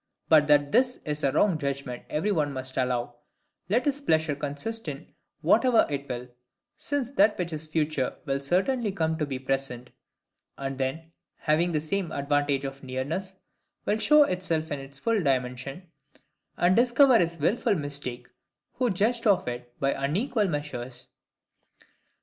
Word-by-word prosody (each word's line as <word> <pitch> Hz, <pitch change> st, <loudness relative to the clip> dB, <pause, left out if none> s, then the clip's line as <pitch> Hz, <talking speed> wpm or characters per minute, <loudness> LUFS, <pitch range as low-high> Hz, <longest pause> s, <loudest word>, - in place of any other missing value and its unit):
But 155 Hz, -2 st, +6 dB
that 145 Hz, -1 st, +4 dB
this 250 Hz, -, +3 dB
is 150 Hz, 0 st, -2 dB
a 135 Hz, -, +3 dB
wrong 165 Hz, +3 st, +2 dB
judgment 140 Hz, -3 st, -4 dB
every 175 Hz, +8 st, 0 dB
one 150 Hz, -6 st, +1 dB
must 130 Hz, -1 st, -5 dB
allow, 125 Hz, -2 st, -1 dB, 0.5 s
let 235 Hz, +8 st, +2 dB
his 290 Hz, 0 st, 0 dB
pleasure 160 Hz, -, +2 dB
consist 150 Hz, +11 st, -4 dB
in -, -, -7 dB, 0.3 s
whatever 250 Hz, -3 st, +4 dB
it 140 Hz, -1 st, -4 dB
will: 125 Hz, 0 st, -4 dB, 0.5 s
since 280 Hz, -4 st, -2 dB
that 210 Hz, -4 st, +4 dB
which 170 Hz, -2 st, -3 dB
is 155 Hz, 0 st, -4 dB
future 155 Hz, -4 st, -1 dB
will 135 Hz, -2 st, 0 dB
certainly 200 Hz, -, 0 dB
come 160 Hz, -3 st, 0 dB
to 150 Hz, -, 0 dB
be 135 Hz, -2 st, -3 dB
present; 130 Hz, -2 st, -3 dB, 0.7 s
and 135 Hz, 0 st, -4 dB
then, 160 Hz, +5 st, -3 dB, 0.3 s
having 165 Hz, +3 st, +1 dB
the 155 Hz, -, +1 dB
same 180 Hz, +3 st, -2 dB
advantage 140 Hz, -1 st, 0 dB
of 135 Hz, 0 st, -6 dB
nearness, 145 Hz, +9 st, -4 dB, 0.5 s
will 215 Hz, -, +1 dB
show 300 Hz, +5 st, +6 dB
itself 170 Hz, -, -1 dB
in 145 Hz, -, -2 dB
its 135 Hz, 0 st, -8 dB
full 220 Hz, +8 st, +1 dB
dimensions, 130 Hz, +2 st, -1 dB, 0.7 s
and 175 Hz, +2 st, +3 dB
discover 245 Hz, +2 st, +5 dB
his 170 Hz, -1 st, 0 dB
wilful 205 Hz, +7 st, +1 dB
mistake 145 Hz, -5 st, -4 dB, 0.5 s
who 250 Hz, -2 st, +2 dB
judged 225 Hz, +4 st, +1 dB
of 200 Hz, -9 st, +3 dB
it 120 Hz, 0 st, -5 dB
by 135 Hz, 0 st, +2 dB
unequal 205 Hz, -, 0 dB
measures. 130 Hz, -6 st, -5 dB
150 Hz, 155 wpm, -27 LUFS, 135-200 Hz, 0.7 s, But